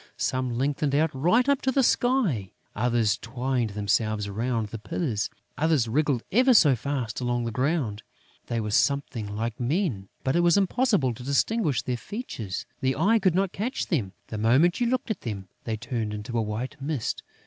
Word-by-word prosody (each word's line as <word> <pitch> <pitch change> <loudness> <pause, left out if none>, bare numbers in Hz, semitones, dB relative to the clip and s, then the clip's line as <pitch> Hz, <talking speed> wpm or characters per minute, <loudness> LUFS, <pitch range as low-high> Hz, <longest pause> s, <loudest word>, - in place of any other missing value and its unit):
Some 130 -2 -1
lengthened 140 +2 0
out 155 +1 +3
right 180 - +3
up 280 -1 +3
to 265 - +1
the 270 +1 +3
sky; 215 - +1 0.2
others 115 -1 +1
twined 125 -2 -1
themselves 105 0 0
round 110 +1 -1
the 115 - -6
pillars; 110 - -2 0.3
others 155 -6 +2
wriggled 135 0 +1
ever 250 +4 +5
so 145 -10 +6
fast 125 -3 -3
along 120 -1 0
the 115 - -2
ground. 130 -4 -1 0.5
They 115 - -1
were 105 -1 -3
something 115 -4 0
like 115 0 -3
men, 125 - -1
but 130 +2 +1
it - - +4
was 175 +2 +4
impossible 200 - +2
to 120 - -11
distinguish 140 - +1
their 125 -1 -2
features; 115 - -5
the 130 0 +1
eye 205 +9 +3
could 185 -4 +2
not 190 -1 +1
catch 235 +7 -2
them. 110 - -1 0.2
The 110 - -4
moment 135 - +3
you 240 - +3
looked 255 -1 -1
at 215 - -4
them, 100 -5 -5 0.2
they 110 -1 -2
turned 115 -2 -3
into 105 +3 -6
a 115 - +2
white 115 +7 -4
mist. 140 -5 -2
130 Hz, 180 wpm, -26 LUFS, 110-170 Hz, 0.5 s, so